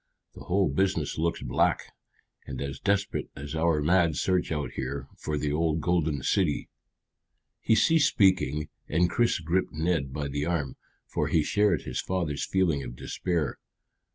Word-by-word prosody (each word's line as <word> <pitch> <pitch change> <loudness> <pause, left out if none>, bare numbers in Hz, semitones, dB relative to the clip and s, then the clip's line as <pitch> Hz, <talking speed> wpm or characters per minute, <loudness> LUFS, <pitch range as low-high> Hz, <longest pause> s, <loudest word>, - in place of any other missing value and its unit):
The - - -11
whole 95 +1 +2
business 80 0 0
looks 85 +1 -1
black, - - 0 0.5
and - - -5
as 70 -1 -4
desperate 100 0 0
as 70 +2 -7
our 80 -2 +1
mad 85 -1 +3
search 90 +2 0
out 75 -2 -2
here 65 +1 -4
for 75 -1 -3
the 75 0 -1
old 80 0 +1
golden 80 -4 0
city." 90 -7 +1 0.9
He 110 - +3
ceased 155 +8 +4
speaking, 75 -7 +2 0.2
and 85 +3 +2
Chris 120 -1 +2
gripped 85 +3 -1
Ned 80 -3 0
by 70 +1 -3
the 70 +1 -2
arm, 75 -6 -1 0.3
for - - -1
he 80 - +2
shared 100 -1 +2
his 65 - -3
father's 85 -6 -2
feeling 90 -7 +1
of - - -7
despair. 85 +3 -2
80 Hz, 155 wpm, -28 LUFS, 75-90 Hz, 0.9 s, ceased